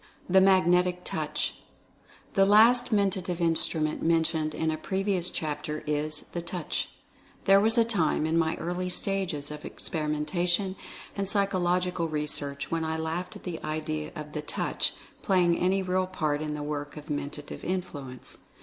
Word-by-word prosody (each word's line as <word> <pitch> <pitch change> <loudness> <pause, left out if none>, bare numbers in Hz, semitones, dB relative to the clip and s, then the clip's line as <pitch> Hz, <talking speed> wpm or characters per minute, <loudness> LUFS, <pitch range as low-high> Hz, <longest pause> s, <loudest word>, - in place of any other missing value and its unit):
THE 190 +1 +6
MAGNETIC 180 -1 +4
TOUCH. - - -2 0.7
The 195 - +5
last 230 +5 +6
Mentative 190 -4 +1
Instrument 160 -2 0
mentioned 160 -2 +1
in 160 0 0
a - - -1
pre 190 +3 -2
vious 185 -3 +1
chapter 150 0 -3
is 150 0 +1
the 175 - -4
Touch. 170 -1 -3 0.6
There 195 0 +7
was 225 +3 +4
a 230 - +6
time, 175 -9 +1
in 160 +1 0
my 165 -1 +2
early 180 +2 -3
stages 180 -7 0
of 150 0 -7
experimentation 175 +5 -1 0.4
and 195 -1 -1
psychological 180 -3 +1
re 150 -1 -1
search, 140 -1 -4
when 165 -1 0
I 160 0 -1
laughed 165 +6 -3
at 205 - -11
the 175 -3 -5
idea 155 0 -3
of 150 0 -7
the 150 - -2
Touch 150 - -1 0.3
play 185 -2 +3
ing 170 -1 +3
any 190 +2 +2
real 185 0 +1
part 155 -5 -1
in 150 -1 -3
the 150 - -4
work 145 0 -4
of 150 0 -8
Mental 145 0 -4 0.2
Influence. 145 -9 -5
170 Hz, 160 wpm, -28 LUFS, 155-185 Hz, 0.7 s, There